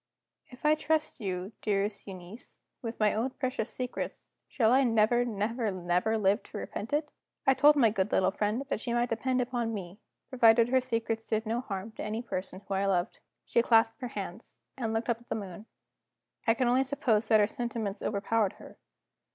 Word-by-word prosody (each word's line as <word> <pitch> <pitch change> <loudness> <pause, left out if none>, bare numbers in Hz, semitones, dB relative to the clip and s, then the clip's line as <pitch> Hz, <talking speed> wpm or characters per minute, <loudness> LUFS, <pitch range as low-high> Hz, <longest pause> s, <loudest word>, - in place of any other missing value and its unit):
"If 255 +2 -12
I 300 - +6
trust 310 0 0
you, 185 -1 -3
dearest 205 0 -1
Euneece, 190 +4 -10 0.2
with 230 -2 -5
my 210 -1 +3
own 225 +5 0
precious 255 -4 -3
secrets, 250 -1 -5 0.2
shall 225 -3 +2
I 270 +1 +5
never, 230 0 +3
never, 225 0 -1
never 180 +4 0
live 205 +1 +2
to - - -9
repent 215 - -5
it?" 295 +1 0 0.4
I 270 - +6
told 290 +3 +6
my 235 -7 +4
good 195 0 -1
little 190 0 +3
friend 210 +6 -1
that 245 - -2
she 235 - -2
might 240 0 +1
depend 250 +2 0
on 230 -2 -1
me, 190 0 -7 0.3
provided 235 -2 +5
her 260 0 +3
secrets 230 -2 -2
did 220 +1 0
no 230 +2 -1
harm 200 -2 -5
to - - -4
any 220 +3 -3
person 185 -3 -5
whom 195 - -1
I 200 +1 +1
loved. 185 +1 0 0.3
She 235 - +3
clasped 225 0 +3
her 250 - -2
hands 200 -1 -7 0.2
and 230 -4 -2
looked 225 +1 -1
up 235 -2 0
at 240 - -22
the - - -1
moon 200 0 -7 0.8
I 225 - +5
can 250 0 +1
only 255 +2 +4
suppose 235 -5 0
that 220 -1 +5
her 205 - +5
sentiments 220 -3 -4
overpowered 205 0 0
her. - - -14
225 Hz, 195 wpm, -30 LUFS, 205-245 Hz, 0.8 s, I